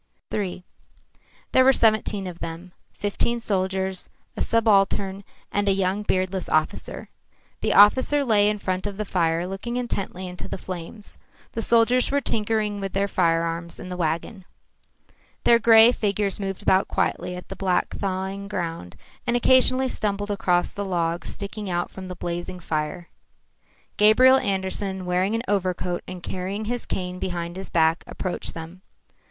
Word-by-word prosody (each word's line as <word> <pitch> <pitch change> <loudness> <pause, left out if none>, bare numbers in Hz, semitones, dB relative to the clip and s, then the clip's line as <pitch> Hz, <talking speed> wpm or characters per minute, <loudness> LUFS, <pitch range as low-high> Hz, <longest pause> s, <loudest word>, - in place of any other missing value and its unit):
III 185 -3 -3 0.9
There 260 - +5
were 265 - +7
seventeen 215 -4 +2
of 175 -2 -7
them, 165 +2 -7 0.2
fifteen 205 +3 -1
soldiers, 190 -3 -1 0.3
a - - -4
subaltern 200 -3 +2 0.3
and 205 0 +1
a - - +4
young 190 +1 0
beardless 185 -2 -1
officer. 155 0 -1 0.5
The - - 0
officer 260 +7 +6
lay 210 -3 +4
in 210 - -1
front 185 0 -2
of 200 -1 -6
the 215 - -2
fire 170 -2 0
looking 195 +6 -4
intently 195 -6 -3
into 180 0 -8
the - - -5
flames. 185 +3 -8 0.3
The 225 - -3
soldiers 235 +2 +3
were 285 - +2
tinkering 215 -4 0
with 195 -1 -4
the 200 +1 +1
firearms 170 -2 0
in 185 - -8
the 180 - -4
wagon. 175 +4 -2 1.0
Their 235 - +6
grey 225 0 +7
figures 205 -3 -1
moved 195 -1 -4
about 190 +1 +3
quietly 180 +1 -1
on 180 - -8
the 195 - -7
black 185 -1 0
thawing 195 0 -3
ground, 165 - -4 0.3
and 240 0 +2
occasionally 255 +1 +4
stumbled 205 -3 -2
across 180 -3 +1
the 200 - -4
logs 170 -3 -1
sticking 200 0 -6
out 175 0 -1
from 190 -1 -8
the 180 - -6
blazing 175 +1 -5
fire. 160 +1 -3 0.9
Gabriel 255 +5 +7
Andersen, 190 -2 -2
wearing 185 +4 +1
an 230 - -2
overcoat 185 -3 -1
and 180 -1 -8
carrying 190 +4 -4
his 245 +2 -3
cane 180 0 -3
behind 175 -2 -4
his 190 +1 -7
back, 165 0 +2
approached 185 -2 -4
them. 165 +3 -9
190 Hz, 155 wpm, -24 LUFS, 180-210 Hz, 1.0 s, were